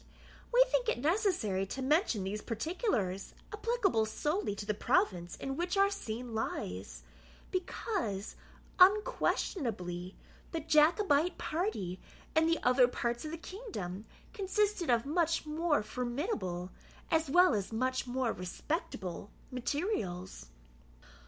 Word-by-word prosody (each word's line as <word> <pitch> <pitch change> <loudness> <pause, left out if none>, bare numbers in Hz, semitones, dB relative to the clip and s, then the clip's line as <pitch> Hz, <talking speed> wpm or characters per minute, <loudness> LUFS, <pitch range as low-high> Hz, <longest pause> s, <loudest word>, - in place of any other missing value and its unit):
We - - +7
think - - +1
it - - +1
necessary 280 - +1
to 265 - -5
mention 285 - +2
these 205 +3 -3
particulars, 225 - -2 0.2
applicable 420 - +1
solely 295 - -1
to 205 - -6
the 210 - 0
province 175 -3 +1
in 270 0 -4
which 355 +5 -1
our 395 0 +5
scene 240 - -5
lies; 90 - -4 0.5
because, 360 - -2 0.4
unquestionably, 235 - +2 0.4
the 330 - 0
Jacobite 315 +2 +4
party, 210 - -2 0.4
in 320 0 +5
the 330 0 +3
other 250 0 +6
parts 240 +1 -2
of - - -3
the 330 - -5
kingdom, 315 - -6 0.3
consisted 405 - 0
of 235 0 +3
much 330 +2 +1
more 305 -3 +1
formidable, 240 - -3 0.4
as 320 -3 +2
well 355 0 +6
as 205 -1 -1
much 255 +3 0
more 250 -1 0
respectable, 185 - -4 0.2
materials. 245 - -2
270 Hz, 120 wpm, -32 LUFS, -, 0.5 s, We